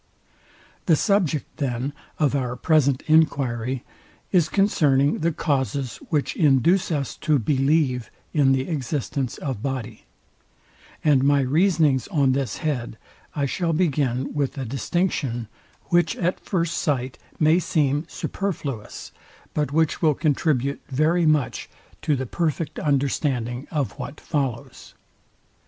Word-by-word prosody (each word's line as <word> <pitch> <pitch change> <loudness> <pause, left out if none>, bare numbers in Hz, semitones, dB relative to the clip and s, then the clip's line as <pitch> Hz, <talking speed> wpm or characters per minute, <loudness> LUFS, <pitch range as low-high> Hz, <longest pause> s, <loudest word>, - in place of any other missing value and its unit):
The 165 - +6
subject, 175 - 0
then, 135 -1 -2 0.2
of 150 -4 +2
our 125 -3 -1
present 140 -1 +2
enquiry 130 -6 +2 0.5
is 170 -5 +3
concerning 150 -9 +2
the 170 +2 +1
causes 140 -4 -1
which 150 -3 0
induce 160 +5 +3
us 140 -4 -2
to 155 -2 +2
believe 135 0 +1 0.2
in 140 -3 +4
the 135 0 +1
existence 140 -3 -2
of 130 -7 -4
body: 125 -5 -4 1.0
And 145 -4 +4
my 140 0 +4
reasonings 150 -1 +2
on 145 -9 +2
this 130 -4 -1
head 125 -7 -2 0.4
I 145 -2 0
shall 165 +4 -1
begin 140 -6 0
with 145 -1 -1
a 135 - -3
distinction, 130 - -1 0.4
which 175 -3 +3
at 180 +1 -1
first 170 -4 -1
sight 130 -3 -1 0.2
may 155 +3 +4
seem 145 -3 +1
superfluous, 145 - -5 0.4
but 150 -3 -1
which 160 +1 +1
will 155 -4 +3
contribute 140 -3 0
very 155 +5 +2
much 145 -6 +1 0.3
to 150 -2 +1
the 130 0 -3
perfect 160 +3 -2
understanding 135 -3 0
of 145 -6 -2
what 145 +1 -6
follows. 135 -7 -4
145 Hz, 125 wpm, -23 LUFS, 130-160 Hz, 1.0 s, The